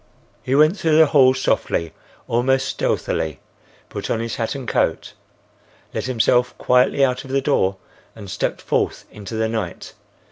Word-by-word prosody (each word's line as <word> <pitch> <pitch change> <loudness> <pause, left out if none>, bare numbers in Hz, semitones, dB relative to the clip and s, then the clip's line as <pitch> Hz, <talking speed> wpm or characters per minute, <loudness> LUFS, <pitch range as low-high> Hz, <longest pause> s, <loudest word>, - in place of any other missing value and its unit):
He 130 - -1
went 155 +7 +4
through 160 -3 +2
the 160 - +8
hall 135 -4 +5
softly, 85 -10 -1 0.3
almost 130 +3 +1
stealthily; 80 -3 -2 0.5
put - - -6
on 115 - 0
his 115 0 -4
hat 115 +2 -2
and 135 -3 -7
coat; - - -1 0.8
let - - -3
himself 125 0 +1
quietly 125 +2 +3
out 125 -1 -2
of 135 - -12
the 135 +1 +1
door 100 -9 +1 0.4
and 105 -3 -10
stepped 90 - -3
forth - - -1
into 105 +1 -8
the 110 0 0
night. 110 -6 -5
125 Hz, 155 wpm, -21 LUFS, 110-135 Hz, 0.8 s, the